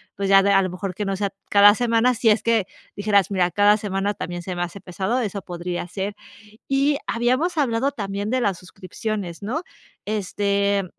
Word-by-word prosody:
pues, 200 0 -2
ya 195 0 +7
de 200 - +3
a 195 -1 +5
lo 185 - -1
mejor 180 +1 -5
que 210 - -3
no 195 0 -1
sea 200 +1 -1 0.2
cada 205 0 +7
semana, 235 +1 +2
si 230 0 +2
es 215 0 +3
que 230 -4 +2 0.3
dijeras, 205 -2 +2
mira, 180 -2 +1
cada 205 +3 +4
semana 200 -1 -2
también 175 0 -5
se 180 +1 -5
me 175 - -1
hace 175 +3 -7
pesado, 195 +7 -2
eso 205 -3 -3
podría 175 0 -5
ser. 195 +3 -4 0.5
Y 275 +1 +2
habíamos 255 +9 0
hablado 265 -1 +1
también 200 -3 -4
de 255 +1 +1
las 195 -6 0
suscripciones, 185 0 -6
¿no? 250 - -2 0.4
Este, 200 -1 0
200 Hz, 190 wpm, -22 LUFS, 190-225 Hz, 0.5 s, ya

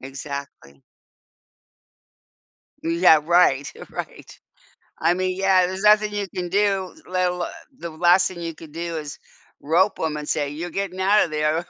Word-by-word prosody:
Exactly. 135 - -8 2.1
Yeah, 165 -2 +5
right, 165 -5 +3 0.2
right. - - -8 0.6
I 175 - +3
mean, 185 0 -1
yeah, 190 -2 +3
there's 190 +2 -5
nothing 210 0 +4
you 205 -1 -2
can 180 -1 -3
do, 195 0 0
let 185 0 0
alo 180 -1 -3 0.3
the 170 - -6
last 175 +3 +4
thing 180 - -10
you 165 -1 -5
could 155 -2 -13
do 170 0 -4
is 150 -2 -7 0.4
rope 180 +7 +2
'em 155 -2 -2
and 150 0 -7
say, 145 -1 0
"You're 165 +4 -6
getting 190 +1 -4
out 205 +3 +4
of - - -8
there." 155 +3 0
175 Hz, 155 wpm, -22 LUFS, 155-185 Hz, 2.1 s, Yeah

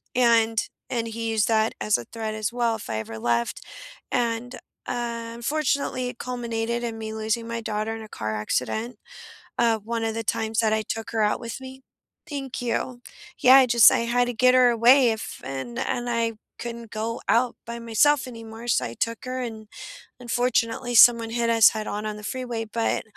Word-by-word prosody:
and 230 -2 +3 0.2
and 230 -2 -1
he 230 0 -4
used 220 +1 +2
that 220 0 +2
as 210 - +2
a 120 - -8
threat 220 -1 -5
as 215 +1 -2
well 235 -2 +1
if 210 - -10
I 110 - -2
ever 110 0 -7
left, 120 +1 0 0.5
and, 240 +1 -1 0.3
uh, 235 -1 -3
unfortunately, 270 -1 -1
it 245 - -10
culminated 235 -1 -3
in 230 -1 -4
me 220 0 -5
losing 220 +1 -2
my 230 0 -4
daughter 215 +1 -2
in 225 - -8
a 215 - -12
car 110 - -4
accident, 125 - -2 0.6
um, 225 -2 +2
one 230 0 -2
of 225 -1 -1
the 225 0 -3
times 220 +2 0
that 220 -1 +1
I 220 - +2
took 225 +1 -5
her 225 -1 0
out 210 - +1
with 235 +2 -6
me. 265 0 -10 0.5
Thank 270 -4 -5
you. 245 +1 -2 0.4
Yeah, 255 +1 +8
I 265 -1 +7
just 235 -2 +7
I - - +2
had 245 +1 +3
to 245 - -2
get 255 +2 +4
her 250 -1 +6
away 240 +2 +5
if 220 - -6
and 135 - -5
and 245 -2 -2
I 230 -1 0 0.2
couldn't 235 -1 -7
go 225 +2 -3
out 240 +1 +2
by 235 +1 -5
myself 250 +5 +3
anymore, 230 0 -9
so 235 - +2
I 115 - -7
took 230 - -3
her, 255 0 -4
and, 220 -3 -6 0.5
unfortunately, 245 0 0
someone 230 -1 +7
hit 235 0 0
us 225 -2 +7
head-on 215 -1 -4
on 215 0 -4
the 210 - -11
freeway, 240 -1 -4
but 225 +1 -1
230 Hz, 195 wpm, -25 LUFS, 220-245 Hz, 0.6 s, Yeah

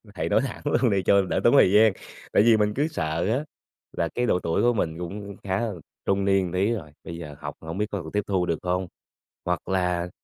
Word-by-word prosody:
Thầy - - -2
nói - - +3
thẳng - - -5
luôn - - +2
đi 95 -1 +1
cho 100 +1 +5
đỡ 95 - -1
tốn - - +5
thời 90 - +6
gian." 105 0 +6 0.4
Tại 100 - +5
vì 115 -1 +6
mình 105 0 +1
cứ 145 +7 +1
sợ 80 - -2
á 130 +6 0 0.5
là 85 -1 0
cái 125 - +1
độ 90 - +2
tuổi 80 -2 0
của 120 0 +4
mình 80 -7 -2
cũng 100 +3 -6
khá 95 0 -1
là 115 -3 -2 0.3
trung 100 0 +1
niên 95 -1 +3
một 90 - -6
tí 95 +4 +1
rồi, 80 -10 -6
bây 85 - -7
giờ 75 -4 -8
học 75 0 -6
hổng 80 +2 -6
biết 105 - +1
có 100 - -3
còn 80 - -8
tiếp 105 0 0
thu 95 -3 +1
được 85 -2 -1
không? 90 +1 -1 0.6
Hoặc 90 0 -2
là 90 -2 0
95 Hz, 250 wpm, -25 LUFS, 85-105 Hz, 0.6 s, thời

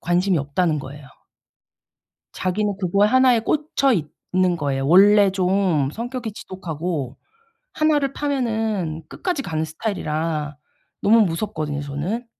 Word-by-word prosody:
"관심이 175 +1 +1
없다."는 150 +3 0
거예요. 140 +1 -9 1.3
자기는 200 +2 -1
그거에 200 +2 +2
1 260 +1 +5
에 230 - +2
꽂혀 275 +2 +1 0.4
있는 185 -1 +2
거예요. 140 -3 -2
원래 200 +4 +6
좀 185 -6 +1
성격이 235 - -5
지독하고 165 - -5 0.6
1 310 -1 +2
를 275 -2 -1
파면은 220 - -2
끝까지 355 -7 -3
가는 160 -8 -2
스타일이라 155 -3 -3 0.5
너무 225 +3 +5
무섭거든요 165 -6 -2
저는. 160 - -4
185 Hz, 270 characters per minute, -22 LUFS, 155-220 Hz, 1.3 s, 원래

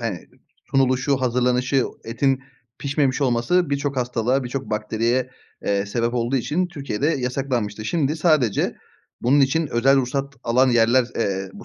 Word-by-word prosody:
hani, 110 -6 -3 0.5
sunuluşu, 135 +1 +2
hazırlanışı, 125 +1 +1 0.2
etin 135 +3 0 0.4
pişmemiş 140 -1 0
olması 140 +6 +1
birçok 140 0 -1
hastalığa, 125 +1 0
birçok 130 +1 -5
bakteriye, 115 +4 0 0.3
eee, 100 0 0
sebep 115 +3 -1
olduğu 120 +2 0
için 155 +8 0
Türkiye'de 140 -6 -3
yasaklanmıştı. 125 -7 -2
Şimdi 150 +4 0
sadece 155 - +2 0.5
bunun 135 +4 +4
için 145 +4 +2
özel 135 +1 +3
ruhsat 135 +1 -1
alan 125 +3 +3
yerler, 120 +2 +4
eee, 95 -3 -2
bu - - -12
130 Hz, 135 wpm, -22 LUFS, 115-140 Hz, 0.5 s, bunun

